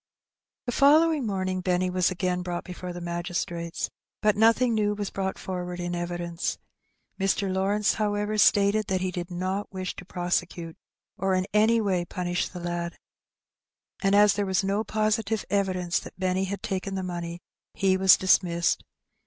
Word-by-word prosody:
The 245 Hz, -, -1 dB
following 295 Hz, +1 st, +4 dB
morning 185 Hz, -2 st, -1 dB
Benny 180 Hz, 0 st, +1 dB
was 180 Hz, -1 st, +2 dB
again 180 Hz, -1 st, -1 dB
brought 175 Hz, -1 st, -4 dB
before 180 Hz, 0 st, -7 dB
the 175 Hz, -, -6 dB
magistrates, 170 Hz, 0 st, -3 dB, 0.4 s
but 210 Hz, -1 st, +4 dB
nothing 230 Hz, +3 st, +4 dB
new 210 Hz, -1 st, +1 dB
was 205 Hz, -1 st, -4 dB
brought 190 Hz, -1 st, -2 dB
forward 180 Hz, -1 st, -5 dB
in 175 Hz, 0 st, -3 dB
evidence. 175 Hz, 0 st, -3 dB, 0.6 s
Mr. 195 Hz, 0 st, +1 dB
Lawrence, 200 Hz, +2 st, +2 dB
however, 210 Hz, 0 st, -1 dB
stated 205 Hz, +1 st, +4 dB
that 185 Hz, -1 st, 0 dB
he 185 Hz, 0 st, -1 dB
did 175 Hz, 0 st, -5 dB
not 185 Hz, +3 st, -3 dB
wish 185 Hz, -2 st, -4 dB
to -, -, -7 dB
prosecute, 175 Hz, -2 st, -2 dB, 0.4 s
or 190 Hz, 0 st, +1 dB
in 185 Hz, 0 st, +1 dB
any 220 Hz, +2 st, +4 dB
way 190 Hz, -5 st, +1 dB
punish 175 Hz, 0 st, -2 dB
the 180 Hz, -, -8 dB
lad. 175 Hz, 0 st, -3 dB, 1.0 s
And 195 Hz, 0 st, +3 dB
as 205 Hz, 0 st, +6 dB
there 205 Hz, -1 st, -1 dB
was 190 Hz, 0 st, +1 dB
no 200 Hz, +2 st, 0 dB
positive 215 Hz, 0 st, 0 dB
evidence 185 Hz, -3 st, +1 dB
that -, -, -12 dB
Benny 185 Hz, 0 st, +1 dB
had 200 Hz, +1 st, -5 dB
taken 195 Hz, 0 st, -3 dB
the 190 Hz, -, -2 dB
money, 170 Hz, -1 st, -5 dB, 0.4 s
he 190 Hz, -1 st, +3 dB
was 190 Hz, 0 st, +6 dB
dismissed. 175 Hz, -2 st, +2 dB
185 Hz, 160 wpm, -26 LUFS, 175-205 Hz, 1.0 s, as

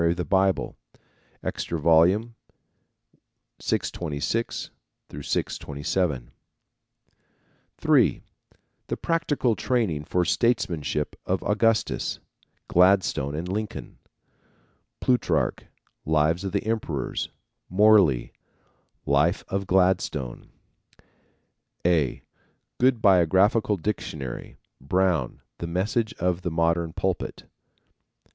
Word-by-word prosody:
of 85 Hz, -, +1 dB
the 90 Hz, -, -2 dB
Bible_, 95 Hz, 0 st, +1 dB, 0.7 s
Extra 85 Hz, -, -3 dB
Vol. 80 Hz, +2 st, +6 dB, 1.5 s
626 85 Hz, +8 st, -2 dB, 0.4 s
627. 70 Hz, 0 st, -2 dB, 1.5 s
(3) -, -, +3 dB, 0.6 s
The -, -, -3 dB
Practical 150 Hz, -8 st, 0 dB
Training 95 Hz, -, 0 dB
for 90 Hz, +2 st, +1 dB
Statesmanship 85 Hz, -, 0 dB
of 95 Hz, 0 st, 0 dB
Augustus, 110 Hz, +1 st, +1 dB, 0.5 s
Gladstone 90 Hz, -6 st, +3 dB
and 85 Hz, +3 st, -4 dB
Lincoln. 105 Hz, +3 st, -5 dB, 1.0 s
Plutarch, 125 Hz, -1 st, +1 dB, 0.4 s
Lives 80 Hz, +3 st, +1 dB
of 95 Hz, -, -3 dB
the 100 Hz, +1 st, -1 dB
Emperors; 110 Hz, -11 st, -2 dB, 0.4 s
Morley, 95 Hz, -, +4 dB, 0.7 s
Life 75 Hz, +6 st, +2 dB
of 100 Hz, 0 st, -2 dB
Gladstone; 90 Hz, -9 st, 0 dB, 1.4 s
A. 80 Hz, -7 st, +1 dB, 0.6 s
good 125 Hz, -2 st, +3 dB
Biographical 95 Hz, +3 st, +4 dB
Dictionary; 80 Hz, -, -5 dB, 0.2 s
Brown, 85 Hz, -3 st, 0 dB, 0.2 s
The 85 Hz, -, -4 dB
Message 105 Hz, +6 st, -1 dB
of 90 Hz, 0 st, -1 dB
the 90 Hz, -, -2 dB
Modern 85 Hz, 0 st, +1 dB
Pulpit. 90 Hz, +1 st, -3 dB
90 Hz, 80 wpm, -25 LUFS, 80-105 Hz, 1.5 s, Vol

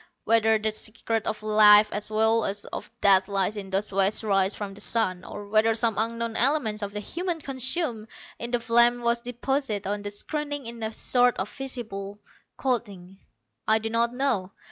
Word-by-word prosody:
Whether 225 Hz, -1 st, +4 dB
the 215 Hz, 0 st, -1 dB
secret 220 Hz, +1 st, -4 dB
of 215 Hz, 0 st, -3 dB
life 210 Hz, 0 st, +6 dB
as 210 Hz, +1 st, -3 dB
well 220 Hz, +1 st, +2 dB
as 200 Hz, +1 st, -3 dB
of 210 Hz, -, -7 dB
death 195 Hz, -1 st, +5 dB
lies 200 Hz, 0 st, -1 dB
in 200 Hz, -2 st, -7 dB
those 195 Hz, +1 st, 0 dB
waste 195 Hz, +3 st, +2 dB
rays 195 Hz, -2 st, +1 dB
from 200 Hz, -2 st, -6 dB
the 200 Hz, -, -12 dB
sun, 185 Hz, -6 st, -1 dB
or 205 Hz, 0 st, -9 dB
whether 220 Hz, +2 st, +3 dB
some 225 Hz, -2 st, 0 dB
unknown 230 Hz, 0 st, -2 dB
element 240 Hz, -5 st, +2 dB
of 200 Hz, -1 st, -4 dB
the 210 Hz, -, -5 dB
humans 340 Hz, -, -4 dB
consumed 260 Hz, -3 st, -1 dB, 0.3 s
in 235 Hz, -, -4 dB
the 245 Hz, 0 st, 0 dB
flame 240 Hz, +1 st, +3 dB
was 235 Hz, 0 st, +1 dB
deposited 245 Hz, -2 st, -2 dB
on 205 Hz, +1 st, -2 dB
the 205 Hz, -, -5 dB
screening 290 Hz, +6 st, -5 dB
in 230 Hz, 0 st, -8 dB
a 220 Hz, 0 st, -2 dB
sort 245 Hz, +2 st, +2 dB
of 190 Hz, +2 st, -4 dB
invisible 220 Hz, -7 st, -5 dB, 0.4 s
coating, 200 Hz, -8 st, -3 dB, 0.5 s
I 220 Hz, -, +5 dB
do 220 Hz, 0 st, -4 dB
not 235 Hz, +1 st, +1 dB
know. 245 Hz, -8 st, -1 dB
220 Hz, 185 wpm, -26 LUFS, 205-240 Hz, 0.5 s, life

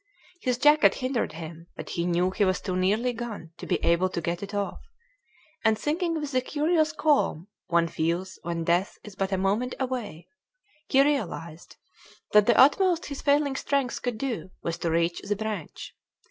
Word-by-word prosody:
His 250 Hz, -2 st, 0 dB
jacket 295 Hz, +3 st, +5 dB
hindered 255 Hz, -2 st, -2 dB
him, 165 Hz, +1 st, -9 dB
but -, -, -8 dB
he 170 Hz, 0 st, -1 dB
knew 180 Hz, +1 st, +1 dB
he 205 Hz, -, +1 dB
was 185 Hz, -1 st, +2 dB
too 185 Hz, -2 st, -3 dB
nearly 210 Hz, +7 st, +1 dB
gone 225 Hz, -8 st, -7 dB
to -, -, -8 dB
be -, -, +2 dB
able 170 Hz, +2 st, +3 dB
to 175 Hz, -, -3 dB
get 170 Hz, +1 st, -3 dB
it 200 Hz, 0 st, -6 dB
off, 205 Hz, -1 st, -3 dB, 0.8 s
and, 220 Hz, -1 st, +3 dB
thinking 330 Hz, -, -1 dB
with 295 Hz, -2 st, -4 dB
the 255 Hz, -1 st, +2 dB
curious 310 Hz, +3 st, +1 dB
calm 285 Hz, -, +1 dB, 0.2 s
one 170 Hz, -1 st, +2 dB
feels 170 Hz, +4 st, -2 dB
when 170 Hz, -1 st, -3 dB
death 175 Hz, +4 st, +1 dB
is 210 Hz, -2 st, -11 dB
but 195 Hz, 0 st, -2 dB
a 190 Hz, -, +1 dB
moment 205 Hz, +7 st, 0 dB
away, 235 Hz, -10 st, -4 dB, 0.6 s
he 270 Hz, 0 st, +5 dB
realized 175 Hz, -, -3 dB, 0.6 s
that 210 Hz, 0 st, +5 dB
the 235 Hz, -, +4 dB
utmost 345 Hz, +5 st, +5 dB
his 280 Hz, -1 st, -6 dB
failing 285 Hz, -1 st, +2 dB
strength 275 Hz, -2 st, -1 dB
could 245 Hz, -3 st, -2 dB
do 240 Hz, -6 st, -3 dB
was 165 Hz, -1 st, -3 dB
to 170 Hz, -, -1 dB
reach 170 Hz, +1 st, 0 dB
the 205 Hz, -, -2 dB
branch. 210 Hz, -5 st, -5 dB
210 Hz, 180 wpm, -26 LUFS, 175-270 Hz, 0.8 s, jacket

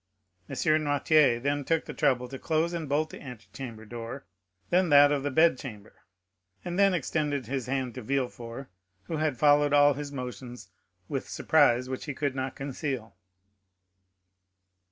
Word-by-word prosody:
M. -, -, -5 dB
Noirtier 150 Hz, -4 st, +3 dB
then 145 Hz, +3 st, -1 dB
took 165 Hz, +3 st, 0 dB
the 150 Hz, -, -7 dB
trouble 125 Hz, -1 st, +1 dB
to 135 Hz, 0 st, -7 dB
close 160 Hz, +2 st, 0 dB
and 165 Hz, -4 st, -4 dB
bolt 155 Hz, +2 st, 0 dB
the -, -, -10 dB
antechamber 120 Hz, -2 st, -9 dB
door, 115 Hz, +4 st, -7 dB, 0.5 s
then 180 Hz, 0 st, +3 dB
that 145 Hz, 0 st, +7 dB
of 145 Hz, -1 st, +1 dB
the 145 Hz, -, -1 dB
bedchamber, 130 Hz, -8 st, +1 dB, 0.7 s
and 175 Hz, +2 st, -3 dB
then 195 Hz, -2 st, +5 dB
extended 145 Hz, -3 st, -1 dB
his 130 Hz, 0 st, -3 dB
hand 130 Hz, -2 st, -2 dB
to 130 Hz, -, -7 dB
Villefort, 125 Hz, 0 st, -4 dB, 0.3 s
who 160 Hz, -, -4 dB
had 155 Hz, -4 st, 0 dB
followed 145 Hz, 0 st, +4 dB
all 145 Hz, 0 st, +6 dB
his 145 Hz, +1 st, -6 dB
motions 125 Hz, -5 st, -7 dB, 0.4 s
with -, -, -4 dB
surprise 120 Hz, +1 st, +3 dB
which 130 Hz, 0 st, -5 dB
he 145 Hz, -3 st, -5 dB
could 145 Hz, -2 st, -1 dB
not 130 Hz, 0 st, -4 dB
conceal. 135 Hz, -, -5 dB
140 Hz, 155 wpm, -28 LUFS, 125-150 Hz, 0.7 s, that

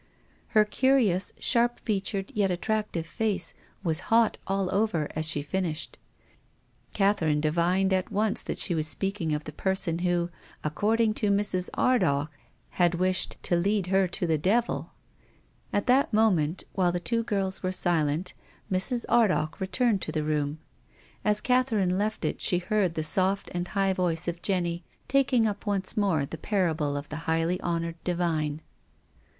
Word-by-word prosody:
Her 215 Hz, -, +7 dB
curious, 215 Hz, -6 st, +2 dB
sharp 240 Hz, 0 st, +2 dB
featured, 195 Hz, -2 st, -2 dB
yet 200 Hz, -2 st, +1 dB
attractive, 185 Hz, -1 st, -2 dB
face 195 Hz, -2 st, -2 dB, 0.3 s
was 160 Hz, -3 st, 0 dB
hot 225 Hz, 0 st, +3 dB
all 195 Hz, -1 st, -1 dB
over 195 Hz, -7 st, +1 dB
as 155 Hz, 0 st, -1 dB
she 150 Hz, -3 st, 0 dB
finished. 165 Hz, -1 st, -3 dB, 1.0 s
Catherine 185 Hz, -7 st, +2 dB
divined 175 Hz, +5 st, +1 dB
at 185 Hz, -1 st, -1 dB
once 210 Hz, +1 st, +2 dB
that -, -, -4 dB
she 180 Hz, -, +1 dB
was 155 Hz, -2 st, +2 dB
speaking 190 Hz, -1 st, -1 dB
of 150 Hz, 0 st, -1 dB
the 155 Hz, -, -7 dB
person 175 Hz, 0 st, 0 dB
who, 175 Hz, -1 st, 0 dB, 0.3 s
according 215 Hz, +8 st, +1 dB
to 210 Hz, -, +2 dB
Mrs. 200 Hz, -3 st, 0 dB
Ardagh, 145 Hz, -, +2 dB, 0.4 s
had 175 Hz, -1 st, +2 dB
wished 185 Hz, +1 st, +1 dB
" -, -, -37 dB
to 175 Hz, -, +1 dB
lead 195 Hz, +2 st, +1 dB
her 190 Hz, -1 st, +4 dB
to 175 Hz, -, -2 dB
the 160 Hz, -2 st, +1 dB
devil." 225 Hz, +9 st, 0 dB, 0.8 s
At 205 Hz, -, 0 dB
this 260 Hz, +2 st, +4 dB
moment, 190 Hz, -7 st, +2 dB
while 180 Hz, -3 st, +2 dB
the 175 Hz, -, -2 dB
two 230 Hz, +6 st, -1 dB
girls 195 Hz, -4 st, -2 dB
were 185 Hz, -, -1 dB
silent, 175 Hz, -2 st, +1 dB, 0.4 s
Mrs. 235 Hz, +6 st, 0 dB
Ardagh 185 Hz, -9 st, +2 dB
returned 195 Hz, +2 st, +1 dB
to -, -, -2 dB
the 155 Hz, -1 st, -1 dB
room. 150 Hz, -1 st, -1 dB, 0.7 s
As 210 Hz, 0 st, +3 dB
Catherine 230 Hz, -8 st, +2 dB
left 210 Hz, +3 st, -1 dB
it -, -, -2 dB
she 180 Hz, -, +2 dB
heard 185 Hz, -1 st, 0 dB
the 155 Hz, -, -1 dB
soft 190 Hz, +5 st, +1 dB
and 175 Hz, 0 st, -2 dB
high 195 Hz, -1 st, +1 dB
V(jice 175 Hz, -2 st, -1 dB
of 170 Hz, 0 st, -3 dB
Jenny 175 Hz, -3 st, -1 dB, 0.2 s
taking 255 Hz, -3 st, +3 dB
u[) 210 Hz, -2 st, 0 dB
once 195 Hz, -2 st, -1 dB
more 190 Hz, -9 st, +1 dB
the 160 Hz, +3 st, -8 dB
parable 160 Hz, -8 st, 0 dB
of 145 Hz, +1 st, -7 dB
the 150 Hz, -, -5 dB
highly 165 Hz, +2 st, +1 dB
honoured 170 Hz, -1 st, -3 dB
divine. 160 Hz, -4 st, -1 dB
185 Hz, 160 wpm, -27 LUFS, 165-210 Hz, 1.0 s, Her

